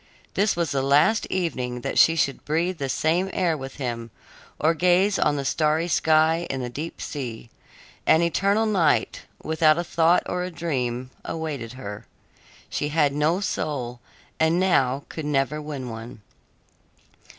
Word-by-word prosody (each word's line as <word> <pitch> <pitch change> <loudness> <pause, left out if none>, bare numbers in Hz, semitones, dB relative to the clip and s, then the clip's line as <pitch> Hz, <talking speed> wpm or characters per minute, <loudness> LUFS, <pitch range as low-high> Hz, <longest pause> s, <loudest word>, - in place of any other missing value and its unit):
This 200 +2 +2
was 170 -4 -1
the 135 -1 0
last 145 +11 +3
evening 125 -9 -2
that - - -1
she 165 - +6
should 140 -3 0
breathe 165 +3 -1
the 135 -1 -2
same 170 +8 +1
air 170 -3 +1
with 135 -2 -7
him 120 -4 -4 0.5
or 160 +2 +3
gaze 180 +4 +3
on 150 - +2
the 140 -1 -3
starry 155 +3 +1
sky 160 0 +3
and 130 -1 -3
the 120 - -5
deep 155 +6 -6
sea. 120 -5 -6 0.6
An 160 +2 +5
eternal 200 +6 +2
night, 185 -8 +1 0.2
without 155 0 +3
a 175 - 0
thought 170 0 +3
or 180 0 -2
a 180 - -3
dream, 130 -7 -3
awaited 145 -8 -5
her. 105 -5 -8 0.6
She 145 - -2
had 150 -2 +2
no 155 +6 +1
soul, 130 -10 -3 0.4
and 160 +2 +3
now 140 -7 +2
could 160 - -6
never 150 +1 0
win 145 -4 -6
one. 115 -1 -8
155 Hz, 155 wpm, -24 LUFS, 135-170 Hz, 0.6 s, she